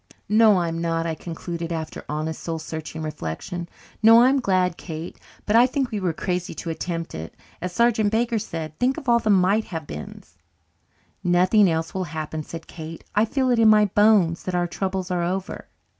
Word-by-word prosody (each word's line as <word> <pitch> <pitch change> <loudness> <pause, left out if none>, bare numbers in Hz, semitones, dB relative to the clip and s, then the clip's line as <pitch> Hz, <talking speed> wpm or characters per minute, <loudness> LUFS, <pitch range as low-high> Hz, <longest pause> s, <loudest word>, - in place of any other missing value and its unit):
"No, 215 -1 +6
I'm 165 -1 -2
not," 165 -1 -1
I 165 - -1
concluded, 170 +1 -6
after 160 -1 -5
honest, 155 +1 -3
soul 165 -1 -3
searching 160 0 -6
reflection. 155 - -5 0.3
"No, 225 +2 +8
I'm 270 +2 +4
glad, 185 -6 +1
Kate. 165 0 -7 0.3
But 210 - +1
I 240 +2 +7
think 260 -1 -2
we 215 - -2
were 185 -3 0
crazy 180 +1 -3
to 165 - -4
attempt 165 0 -4
it, 80 +1 -7 0.3
as 180 - -3
Sergeant 225 0 +2
Baker 230 0 +1
said. 160 -6 -6
Think 255 +2 +1
of 270 - -8
all 235 -1 +5
the 220 - -2
might 200 +2 +3
have 160 -3 -6
beens." 75 - -10 0.8
"Nothing 185 +3 +4
else 160 0 -2
will 190 -1 -2
happen," 155 -1 -5
said 165 +1 -8
Kate. 160 0 -9
"I 210 +2 +3
feel 260 +2 0
in 230 -2 +5
my 210 -1 +6
bones 200 -4 +3
that 185 - -2
our 175 0 +1
troubles 190 +1 -3
are 180 -1 0
over." 185 +3 -3
180 Hz, 190 wpm, -23 LUFS, 165-215 Hz, 0.8 s, No